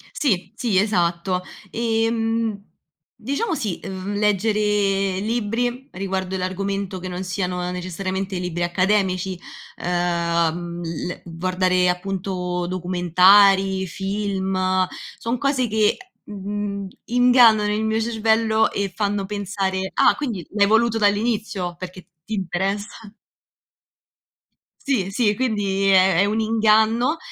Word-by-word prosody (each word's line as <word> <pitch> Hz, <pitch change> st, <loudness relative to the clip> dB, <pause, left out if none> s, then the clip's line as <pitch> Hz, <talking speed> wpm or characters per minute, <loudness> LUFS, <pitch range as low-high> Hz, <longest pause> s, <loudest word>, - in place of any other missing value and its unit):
Sì, 205 Hz, -, 0 dB
sì, 225 Hz, -6 st, 0 dB
esatto, 180 Hz, -2 st, +1 dB, 0.3 s
ehm, 225 Hz, -1 st, 0 dB, 0.6 s
diciamo 280 Hz, -, -2 dB
sì, 210 Hz, -, -3 dB
uhm, 190 Hz, +1 st, -5 dB
leggere 205 Hz, -2 st, +1 dB
libri 240 Hz, +4 st, -2 dB
riguardo 190 Hz, 0 st, -3 dB
l'argomento 195 Hz, +1 st, -3 dB
che 185 Hz, -, -6 dB
non 180 Hz, +1 st, -4 dB
siano 180 Hz, -1 st, -2 dB
necessariamente 185 Hz, +1 st, -4 dB
libri 180 Hz, -1 st, -3 dB
accademici, 185 Hz, 0 st, 0 dB, 0.5 s
uhm, 170 Hz, -1 st, -1 dB
l 170 Hz, +1 st, -5 dB
guardare, 180 Hz, +1 st, +1 dB
appunto, 180 Hz, -1 st, -2 dB
documentari, 190 Hz, +2 st, +4 dB
film; 190 Hz, -1 st, -1 dB, 0.3 s
son 235 Hz, +2 st, -2 dB
cose 275 Hz, -3 st, +1 dB
che, 215 Hz, -1 st, +2 dB, 0.3 s
mhmm, 200 Hz, 0 st, -4 dB, 0.2 s
ingannano 240 Hz, -4 st, +5 dB
il 215 Hz, +1 st, -1 dB
mio 220 Hz, 0 st, 0 dB
cervello 220 Hz, -1 st, +2 dB
e 200 Hz, -2 st, -2 dB
fanno 205 Hz, -2 st, -1 dB
pensare: 195 Hz, -1 st, -2 dB
"Ah, -, -, +5 dB
quindi 225 Hz, -, -4 dB
l'hai 200 Hz, -1 st, +3 dB
voluto 225 Hz, +1 st, +3 dB
dall'inizio 205 Hz, -3 st, 0 dB
perché 185 Hz, 0 st, -8 dB
t -, -, -44 dB, 0.2 s
ti 220 Hz, -, -7 dB
interessa". 200 Hz, +3 st, -3 dB, 1.7 s
Sì, 255 Hz, -10 st, 0 dB
sì 210 Hz, 0 st, +1 dB
quindi, 205 Hz, -5 st, 0 dB
è 190 Hz, -2 st, +5 dB
è 200 Hz, -, +5 dB
un 215 Hz, +2 st, 0 dB
inganno. 220 Hz, +5 st, +3 dB
195 Hz, 110 wpm, -22 LUFS, 185-220 Hz, 1.7 s, ingannano